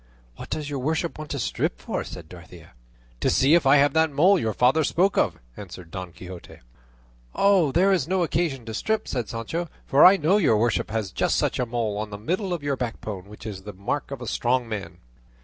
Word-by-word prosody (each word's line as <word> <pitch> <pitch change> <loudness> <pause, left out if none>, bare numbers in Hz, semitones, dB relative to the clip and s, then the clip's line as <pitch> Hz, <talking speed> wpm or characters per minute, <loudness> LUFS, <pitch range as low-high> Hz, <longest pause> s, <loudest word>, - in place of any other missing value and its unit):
"What - - -10
does 150 -2 -3
your 145 -2 -3
worship 160 +4 -2
want 155 -1 -7
to 140 - -3
strip 120 - -2
for?" - - -3
said 85 -3 -9
Dorothea. 85 0 -13 0.5
"To - - +1
see 135 +4 +4
if 170 -5 +4
I 135 - +7
have 145 -1 +4
that 160 0 +3
mole 175 +7 +4
your 110 - -1
father 130 +6 +3
spoke 185 +6 +2
of," - - +1 0.2
answered 90 -4 -10
Don 90 -1 -6
Quixote. 90 0 -11 0.8
"There 190 -2 +3
is 170 -7 +1
no 185 0 +1
occasion 150 -6 -1
to 110 - -6
strip," 220 - -1
said 120 -4 -3
Sancho; 160 +10 -4 0.2
"for 140 - +4
I 190 +2 +9
know 180 +5 +3
your 145 - +3
worship 115 0 0
has 110 -3 -3
just - - 0
such - - 0
a 125 - 0
mole 115 -3 -2
on 110 0 -4
the 105 - -7
middle 180 - -2
of 170 -4 -3
your 145 -1 0
backbone, 110 -6 -5
which 105 0 -12
is 100 -4 -6
the 105 +1 -9
mark 100 +10 -3
of 135 -3 -6
a - - -7
strong 125 +1 0
man." 95 -6 -6
130 Hz, 220 wpm, -24 LUFS, 105-160 Hz, 0.8 s, I